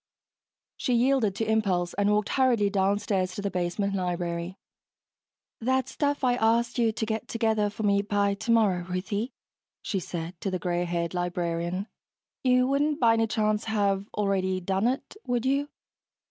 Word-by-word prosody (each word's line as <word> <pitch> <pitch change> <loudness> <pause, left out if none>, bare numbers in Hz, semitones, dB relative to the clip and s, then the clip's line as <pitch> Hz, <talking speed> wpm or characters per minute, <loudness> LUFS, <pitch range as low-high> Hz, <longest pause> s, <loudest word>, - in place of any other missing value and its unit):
She 250 - 0
yielded 240 -4 +2
to 225 - -1
impulse 195 -5 +1
and 205 0 +1
walked 210 0 +1
hurriedly 240 -6 +2
downstairs 195 -1 0
to 205 - -4
the 200 - -1
basement 180 +3 -1
library. 175 -1 -2 1.0
"That 260 +2 +1
stuff 285 -1 -1
I 250 -1 +4
asked 235 +1 +2
you 230 -2 +3
to 220 0 -3
get 220 0 -3
together 220 -2 +1
for 210 +2 -6
me 200 -1 +3
by 200 0 +1
tomorrow, 210 -4 +2
Ruthie," 205 +6 -2 0.5
she 195 - -1
said 170 0 -6
to 195 - -1
the 185 - -1
gray 175 -1 -1
haired 170 -1 -2
librarian. 175 +1 -2 0.6
"You 250 -1 +4
wouldn't 285 +3 +1
by 230 -2 +5
any 225 0 +2
chance 215 0 0
have 200 -2 0
already 190 -2 0
done 190 +4 0
it, 260 +9 -3
would 245 0 0
you?" 280 +2 +1
205 Hz, 160 wpm, -27 LUFS, 185-230 Hz, 1.0 s, by